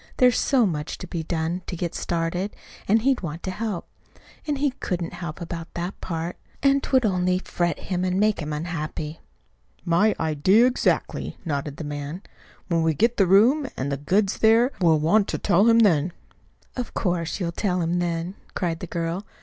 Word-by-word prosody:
There's 250 Hz, -2 st, +5 dB
so 255 Hz, -4 st, +3 dB
much 155 Hz, -5 st, -3 dB
to -, -, -7 dB
be 170 Hz, -1 st, -3 dB
done 165 Hz, +2 st, -2 dB
to -, -, -4 dB
get 170 Hz, 0 st, -3 dB
started, 175 Hz, +4 st, -2 dB, 0.3 s
and 220 Hz, +2 st, +3 dB
he'd 270 Hz, -1 st, +2 dB
want 165 Hz, -1 st, -5 dB
to 185 Hz, -, -2 dB
help. 210 Hz, -2 st, -4 dB, 0.6 s
And 295 Hz, -2 st, 0 dB
he 285 Hz, 0 st, +1 dB
couldn't 180 Hz, -9 st, -4 dB
help 170 Hz, -2 st, -6 dB
about 165 Hz, -1 st, -6 dB
that 175 Hz, +3 st, -4 dB
part; 170 Hz, 0 st, -4 dB, 0.3 s
and't 275 Hz, 0 st, +2 dB
would 260 Hz, -3 st, +4 dB
only 180 Hz, -2 st, +2 dB
fret 175 Hz, -3 st, -1 dB
him 180 Hz, -1 st, -3 dB
and 185 Hz, +1 st, 0 dB
make 210 Hz, 0 st, +2 dB
him 155 Hz, -2 st, -4 dB
unhappy." 155 Hz, 0 st, -4 dB, 0.7 s
"My 180 Hz, +6 st, +3 dB
idea 160 Hz, +9 st, +4 dB
exactly," 255 Hz, 0 st, 0 dB
nodded 145 Hz, -2 st, -3 dB
the -, -, -5 dB
man. 145 Hz, +5 st, -5 dB, 0.4 s
"When 170 Hz, -2 st, +1 dB
we 160 Hz, -1 st, +2 dB
get 230 Hz, -, +2 dB
the 195 Hz, -, +4 dB
room, 240 Hz, -, +5 dB
and 140 Hz, +2 st, -2 dB
the 140 Hz, -, -1 dB
goods 190 Hz, +8 st, +1 dB
there, 230 Hz, +4 st, +5 dB
we'll 165 Hz, -3 st, +5 dB
want 195 Hz, +7 st, +3 dB
to -, -, -2 dB
tell 195 Hz, +1 st, +3 dB
him 230 Hz, -, +6 dB
then." 175 Hz, -7 st, +4 dB, 0.6 s
"Of 250 Hz, -2 st, -5 dB
course, 175 Hz, -3 st, -1 dB
you'll 170 Hz, -3 st, -1 dB
tell 180 Hz, 0 st, -1 dB
him 170 Hz, +1 st, 0 dB
then," 170 Hz, +1 st, -2 dB, 0.2 s
cried 170 Hz, -3 st, -1 dB
the 180 Hz, -, -6 dB
girl. 170 Hz, +3 st, -3 dB
175 Hz, 185 wpm, -24 LUFS, 165-210 Hz, 0.7 s, him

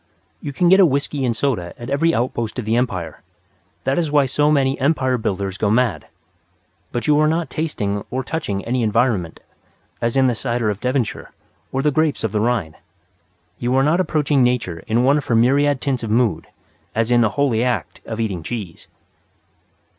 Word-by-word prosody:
You 145 Hz, -, -5 dB
can 175 Hz, +5 st, +1 dB
get 190 Hz, +3 st, +6 dB
a -, -, +8 dB
whisky 140 Hz, 0 st, -1 dB
and 115 Hz, -3 st, -1 dB
soda 105 Hz, -12 st, -1 dB
at 120 Hz, +3 st, -7 dB
every 165 Hz, +4 st, +2 dB
outpost 120 Hz, -5 st, -2 dB
of 125 Hz, -, -3 dB
the 110 Hz, +1 st, +1 dB
Empire: 95 Hz, -10 st, -2 dB, 0.6 s
that 135 Hz, +5 st, +1 dB
is 165 Hz, -3 st, 0 dB
why 145 Hz, -2 st, +4 dB
so 145 Hz, +3 st, +1 dB
many 135 Hz, -3 st, +2 dB
Empire 130 Hz, -2 st, +1 dB
builders 100 Hz, -4 st, -3 dB
go 105 Hz, -, +1 dB
mad. 115 Hz, 0 st, +1 dB, 0.8 s
But 120 Hz, -, -3 dB
you 150 Hz, -1 st, +4 dB
are 155 Hz, -, +4 dB
not 160 Hz, -3 st, -1 dB
tasting 105 Hz, -11 st, -2 dB
or 130 Hz, +1 st, -2 dB
touching 105 Hz, -10 st, -3 dB
any 125 Hz, +1 st, 0 dB
environment, 105 Hz, -5 st, 0 dB, 0.6 s
as 115 Hz, +3 st, 0 dB
in 135 Hz, -, +4 dB
the 125 Hz, -, +3 dB
cider 120 Hz, -2 st, -1 dB
of 100 Hz, -, -6 dB
Devonshire 125 Hz, -3 st, -2 dB, 0.4 s
or 135 Hz, 0 st, -1 dB
the 150 Hz, -, +3 dB
grapes 155 Hz, +1 st, 0 dB
of 110 Hz, -, -1 dB
the 105 Hz, -, 0 dB
Rhine. 105 Hz, -9 st, -1 dB, 0.8 s
You 125 Hz, +1 st, 0 dB
are 135 Hz, -, +4 dB
not 155 Hz, +5 st, +2 dB
approaching 150 Hz, -6 st, +1 dB
Nature 120 Hz, -9 st, 0 dB
in 115 Hz, +3 st, +2 dB
one 140 Hz, +3 st, +4 dB
of 145 Hz, -, -7 dB
her 120 Hz, -, +2 dB
myriad 140 Hz, +4 st, +3 dB
tints 135 Hz, -3 st, -1 dB
of 115 Hz, -, -4 dB
mood, 110 Hz, -7 st, +1 dB, 0.5 s
as 115 Hz, +2 st, 0 dB
in 120 Hz, -1 st, +5 dB
the 115 Hz, -, +3 dB
holy 125 Hz, -5 st, +2 dB
act 125 Hz, -1 st, -2 dB
of 110 Hz, 0 st, -6 dB
eating 100 Hz, -6 st, -2 dB
cheese. 100 Hz, -2 st, -6 dB
125 Hz, 190 wpm, -20 LUFS, 110-140 Hz, 0.8 s, a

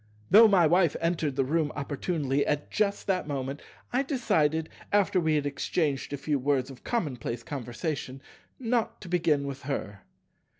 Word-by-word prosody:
Though 220 Hz, +4 st, +9 dB
my 190 Hz, -5 st, +5 dB
Wife 170 Hz, 0 st, +3 dB
entered 165 Hz, -4 st, 0 dB
the 135 Hz, -1 st, +1 dB
room 155 Hz, +1 st, 0 dB
opportunely 145 Hz, -1 st, -1 dB
at 150 Hz, 0 st, -1 dB
just 200 Hz, -1 st, 0 dB
that 185 Hz, -5 st, 0 dB
moment, 135 Hz, 0 st, -3 dB, 0.3 s
I 255 Hz, -, +3 dB
decided, 160 Hz, -, +1 dB, 0.2 s
after 200 Hz, -2 st, +3 dB
we 160 Hz, -2 st, +2 dB
had 145 Hz, -1 st, 0 dB
exchanged 145 Hz, 0 st, -1 dB
a 145 Hz, -, -2 dB
few 145 Hz, 0 st, -1 dB
words 135 Hz, 0 st, 0 dB
of 130 Hz, -, -13 dB
commonplace 125 Hz, -, -2 dB
conversation, 130 Hz, +2 st, -4 dB, 0.4 s
not 235 Hz, -2 st, -1 dB
to 190 Hz, -, -9 dB
begin 165 Hz, -5 st, +1 dB
with 140 Hz, 0 st, -5 dB
her. 105 Hz, -7 st, -4 dB
150 Hz, 160 wpm, -28 LUFS, 140-180 Hz, 0.4 s, Though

